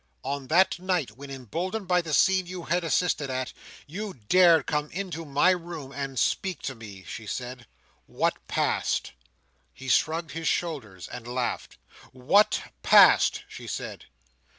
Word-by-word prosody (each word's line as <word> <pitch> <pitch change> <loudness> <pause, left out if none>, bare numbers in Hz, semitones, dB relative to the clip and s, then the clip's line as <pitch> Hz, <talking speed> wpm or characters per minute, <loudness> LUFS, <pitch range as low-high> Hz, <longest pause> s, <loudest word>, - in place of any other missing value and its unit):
"On 140 0 -4
that 175 +3 +3
night, 180 - -1
when, 140 +6 -11
emboldened 170 - -4
by 180 0 +3
the 165 -2 -7
scene 185 +5 +3
you 180 -1 -6
had 175 +2 0
assisted 165 -3 0
at, 130 0 -3 0.3
you 195 +6 -6
dared 170 -5 +6
come 150 0 -1
to 180 -3 -5
my 145 +5 +3
room 170 -6 -5
and 135 -2 -5
speak 185 +6 0
to 135 - -3
me," 105 -5 -11
she 110 +4 -8
said, 125 +2 -6 0.4
"what - - 0
passed?" - - 0 0.6
He 135 - -11
shrugged 160 +6 +1
his 165 0 -4
shoulders, 115 - -2
and 120 -1 -9
laughed 125 0 -3 0.4
"What 140 +12 +3 0.2
passed?" - - +6
she - - -10
said. - - -6
155 Hz, 150 wpm, -27 LUFS, 130-180 Hz, 0.6 s, dared